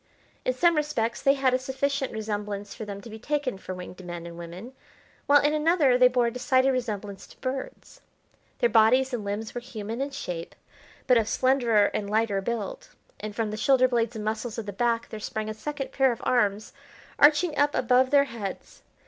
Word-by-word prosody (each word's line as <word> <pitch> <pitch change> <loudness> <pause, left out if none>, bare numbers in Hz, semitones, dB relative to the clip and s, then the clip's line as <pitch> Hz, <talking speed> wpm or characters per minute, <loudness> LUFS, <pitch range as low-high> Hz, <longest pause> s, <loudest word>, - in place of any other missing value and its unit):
In 255 - +2
some 340 +6 +3
respects 290 -7 -1
they 275 0 +4
had 265 -2 +2
a 255 - +2
sufficient 270 +1 -2
resemblance 205 -2 -4
for 220 - -7
them 200 -1 -7
to 230 - -11
be 220 - -9
taken 280 -4 -2
for 185 - -6
winged 180 0 -9
men 175 -1 -7
and 170 0 -8
women, 175 +8 -9 0.5
while 290 0 +7
in 295 +1 +2
another 305 -4 +3
they 250 0 +7
bore 250 -1 +2
a 235 - 0
decided 260 +1 +2
resemblance 210 -6 -4
to - - -17
birds. 260 0 -6 0.6
Their 240 - +2
bodies 245 +4 +4
and 235 -4 -2
limbs 205 +2 -4
were 245 - -4
human 225 0 -6
in 280 - -1
shape, 180 -12 -6 0.5
but 250 -2 +5
of 220 -1 -1
slenderer 240 -5 +3
and 200 -1 -3
lighter 215 -2 +1
build; 215 -1 -4 0.3
and 210 0 -6
from 220 -1 -1
the 215 - -4
shoulder 255 +3 +4
blades 235 -2 0
and 215 -1 -5
muscles 220 +2 -3
of 225 - -4
the 205 - -6
back 230 +2 0
there 220 - -7
sprang 215 +1 -4
a - - -3
second 280 +5 -5
pair 265 -1 +3
of 235 - -6
arms 210 -4 +1 0.5
arching 300 +2 +5
up 290 +1 +2
above 255 +1 +3
their 280 0 +5
heads. 230 -7 -7
235 Hz, 200 wpm, -26 LUFS, 210-265 Hz, 0.6 s, while